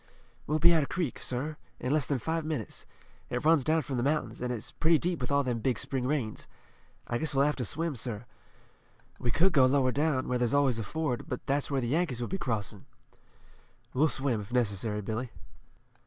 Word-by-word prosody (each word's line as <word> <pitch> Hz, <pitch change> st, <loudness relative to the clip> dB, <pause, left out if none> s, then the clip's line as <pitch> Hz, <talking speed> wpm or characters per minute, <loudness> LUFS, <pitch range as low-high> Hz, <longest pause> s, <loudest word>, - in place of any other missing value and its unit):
We'll 150 Hz, -, +2 dB
be 170 Hz, +2 st, +6 dB
at 160 Hz, -, +4 dB
a 140 Hz, -, -2 dB
creek, 170 Hz, -8 st, -2 dB
sir, 145 Hz, +5 st, -2 dB, 0.2 s
in 125 Hz, -, -1 dB
less 150 Hz, -3 st, +1 dB
than 140 Hz, -, +1 dB
five 160 Hz, +7 st, -1 dB
minutes. 150 Hz, -8 st, -4 dB, 0.4 s
It 125 Hz, +4 st, -2 dB
runs 160 Hz, -3 st, +5 dB
down 160 Hz, +3 st, +2 dB
from 135 Hz, -1 st, -3 dB
the -, -, +1 dB
mountains, 150 Hz, +1 st, 0 dB
an' 125 Hz, -, -1 dB
it's 120 Hz, -3 st, -3 dB
pretty 165 Hz, 0 st, +3 dB
deep 170 Hz, -2 st, -1 dB
with 125 Hz, -, -2 dB
all 140 Hz, 0 st, +3 dB
them 125 Hz, -3 st, -1 dB
big 125 Hz, +2 st, 0 dB
spring 130 Hz, -2 st, -2 dB
rains. 130 Hz, -7 st, -2 dB, 0.6 s
I 120 Hz, -, -2 dB
guess 155 Hz, -3 st, -1 dB
we'll 135 Hz, +1 st, +5 dB
have 150 Hz, -, +1 dB
to 125 Hz, -, -2 dB
swim, 160 Hz, +6 st, -1 dB
sir. 115 Hz, -2 st, -4 dB, 0.9 s
We 120 Hz, -, -1 dB
could 175 Hz, +9 st, +3 dB
go 135 Hz, -5 st, +6 dB
lower 130 Hz, -1 st, +3 dB
down, 140 Hz, -1 st, +1 dB
where 125 Hz, -1 st, 0 dB
there's 120 Hz, +2 st, +2 dB
always 135 Hz, -5 st, +3 dB
a -, -, -2 dB
ford, 145 Hz, +2 st, -2 dB
but 125 Hz, -, -4 dB
that's 140 Hz, +1 st, +1 dB
where 140 Hz, -2 st, 0 dB
the 120 Hz, -, -2 dB
Yankees 145 Hz, -2 st, +1 dB
would 120 Hz, -, -3 dB
be 195 Hz, -, -1 dB
crossing." 105 Hz, -, -3 dB, 1.1 s
"We'll 145 Hz, +5 st, +4 dB
swim, 135 Hz, -6 st, 0 dB
if 100 Hz, +3 st, -10 dB
necessary, 105 Hz, -3 st, 0 dB
Billy." 110 Hz, +5 st, -3 dB
135 Hz, 215 wpm, -30 LUFS, 120-155 Hz, 1.1 s, be